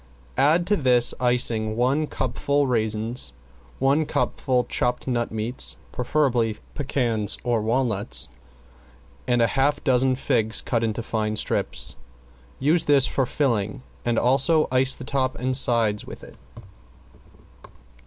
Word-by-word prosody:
Add 155 +6 +3
to 205 +3 +2
this 125 -7 +3
icing 115 -3 +1
one 135 +6 +1
cupful 140 +2 -1
chopped 135 - -2
raisins, 110 - -1 0.4
one 140 +3 +1
cupful 130 -4 0
chopped 125 +1 -2
nut 120 -2 -1
meats, 110 +3 +1
preferably 125 -4 0 0.2
pecans 120 -7 -1
or 120 -3 0
walnuts, 105 - 0 1.0
and 120 -1 +2
a 115 - 0
half 145 +2 +1
dozen 130 -1 +2
figs 115 -4 +1
cut 115 -2 -1
in 110 -2 -1
fine 110 -2 -2
strips. 65 -10 -2 0.6
Use 155 +5 +2
this 140 -2 +4
for 135 -3 -1
filling 115 -5 -1 0.2
and 120 -1 0
also 135 +6 +3
ice 130 +1 +3
the - - -9
top 130 -1 -1
and 130 +1 -1
sides 115 -5 +2
with - - -11
it. - - -13
125 Hz, 130 wpm, -23 LUFS, 115-135 Hz, 1.0 s, this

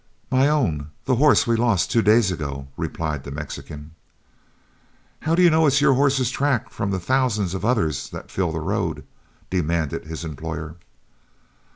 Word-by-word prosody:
"'My 130 +2 +4
own; 80 - 0 0.2
the 130 -2 +2
horse 145 +2 +5
we 115 - +2
lost 115 -5 +1
two 115 - +3
days 110 -1 +4
ago,' 70 -5 -5
replied 75 -4 -3
the - - -8
Mexican. 75 +1 -8 1.3
"'How 160 +1 0
do 180 - +4
you 175 - +6
know 160 0 +4
it's 140 0 +3
your 145 -2 +4
horse's 135 -2 +2
track 140 -4 0
from 100 - -3
the 95 - 0
thousands 110 -4 0
of 95 - -4
others 105 - 0
that - - -9
fill 90 -3 -1
the 80 0 -3
road?' - - -2 0.5
demanded 85 -5 -1
his 80 +1 -6
employer. 80 +1 -6
100 Hz, 165 wpm, -23 LUFS, 80-130 Hz, 1.3 s, you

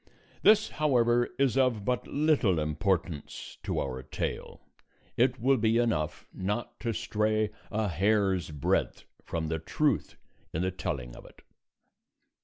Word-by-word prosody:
This, 215 0 +5
however, 120 -4 +3
is 135 -4 +2
of 125 -6 +2
but 125 +1 -1
little 145 - +2
importance 75 +1 -2
to - - -2
our 65 -1 -3
tale; - - -4 0.6
it 125 +1 +2
will 135 +3 +3
be 110 0 +2
enough 75 -11 0
not 105 +5 -3
to 115 - -1
stray 110 0 0 0.2
a 110 0 0
hair's 95 0 +1
breadth 75 -3 -1 0.2
from 80 -1 -3
the 80 0 -2
truth 140 - 0 0.4
in 80 - -1
the 95 - 0
telling 60 -9 -4
of - - -11
it. - - -17
105 Hz, 135 wpm, -29 LUFS, 85-120 Hz, 0.6 s, This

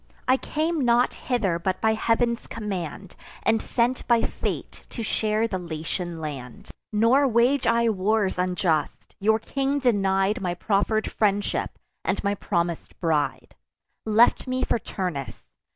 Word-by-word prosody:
I 255 - +5
came 315 +4 -1
not 240 0 +3
hither 205 -10 -1
but 185 +1 -1
by 220 0 +3
Heav'n's 235 +2 0
command, 195 -4 -5 0.3
And 225 0 +2
sent 245 +1 0
by 235 -1 +4
fate - - -4
to 230 - -5
share 215 +1 0
the 190 -4 -3
Latian 170 +1 -4
land. 140 -6 -7 0.2
Nor 230 +6 +4
wage 245 +3 +3
I 235 0 +3
wars 205 -2 +1
unjust: 180 -4 -1
your 220 +2 +3
king 275 +5 -1
denied 200 -4 +2
My 175 -2 -1
proffer'd 215 +3 0
friendship, 205 -1 0 0.3
and - - -1
my 200 0 +1
promis'd 170 -4 -2
bride; 160 -4 -1 0.5
Left 225 +4 +4
me 255 0 -1
for - - +1
Turnus. 155 - -5
215 Hz, 135 wpm, -25 LUFS, 180-235 Hz, 0.5 s, I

